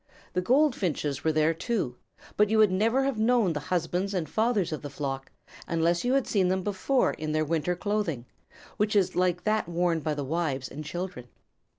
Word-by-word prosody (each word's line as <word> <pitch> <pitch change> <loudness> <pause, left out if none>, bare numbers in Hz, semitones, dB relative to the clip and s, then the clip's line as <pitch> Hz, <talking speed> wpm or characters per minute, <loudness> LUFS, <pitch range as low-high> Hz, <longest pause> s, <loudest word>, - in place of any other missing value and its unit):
The 180 - +1
Goldfinches 185 - +1
were 160 - +3
there 155 +1 +2
too, 165 - -2 0.4
but 210 0 +3
you 220 - +2
would 215 -3 +5
never 225 +8 +2
have 270 -5 -1
known 225 -5 +3
the 150 - -2
husbands 180 +3 -1
and 170 -4 -1
fathers 215 -2 +1
of 155 - -4
the 145 - -6
flock, 135 -1 -4 0.4
unless 170 +1 +1
you 250 +1 +1
had 270 -2 +2
seen 190 -4 +2
them 185 0 0
before 205 +7 +1
in 155 0 -4
their 155 0 +1
winter 165 +3 0
clothing, 180 - -2 0.5
which 210 0 +1
is 195 -3 +2
like 180 -1 +1
that 215 -4 0
worn 170 -1 +1
by 155 -1 -2
the 145 -1 -3
wives 145 -3 -2
and 150 +3 -7
children. 175 -5 -5
180 Hz, 195 wpm, -27 LUFS, 155-210 Hz, 0.5 s, would